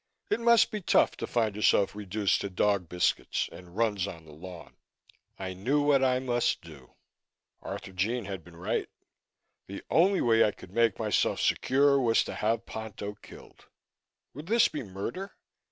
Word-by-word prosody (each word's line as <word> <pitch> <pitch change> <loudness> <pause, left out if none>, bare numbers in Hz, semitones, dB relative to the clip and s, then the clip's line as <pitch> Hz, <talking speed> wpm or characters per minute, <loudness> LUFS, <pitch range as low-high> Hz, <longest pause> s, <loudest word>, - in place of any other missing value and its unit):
It - - +2
must 235 -2 +4
be 215 - -4
tough - - +3
to - - -4
find 110 -4 0
yourself 105 -1 +3
reduced 105 0 0
to 100 - -3
dog 95 -2 0
biscuits 90 0 0
and 90 +1 -13
runs 105 -4 +1
on 85 -5 -9
the 80 - -14
lawn. 85 +3 -11 0.6
I 95 -1 -5
knew 120 +11 0
what 140 -2 +3
I 130 -1 +3
must 120 -7 0
do. 75 -6 -14 0.7
Arthurjean 100 +5 -3
had 95 -4 -6
been 85 0 -15
right. 85 +2 -2 0.8
The 100 - -8
only 185 +4 +4
way 115 -1 +4
I 105 - +1
could 90 - -14
make 115 -1 +2
myself - - 0
secure 140 +1 +3
was 115 -2 +3
to - - -6
have 115 +2 -1
Ponto 105 -2 -6
killed. - - -16 0.7
Would 150 +4 -9
this 230 +2 +4
be 150 - -5
murder? 115 - -6
105 Hz, 165 wpm, -28 LUFS, 95-130 Hz, 0.8 s, must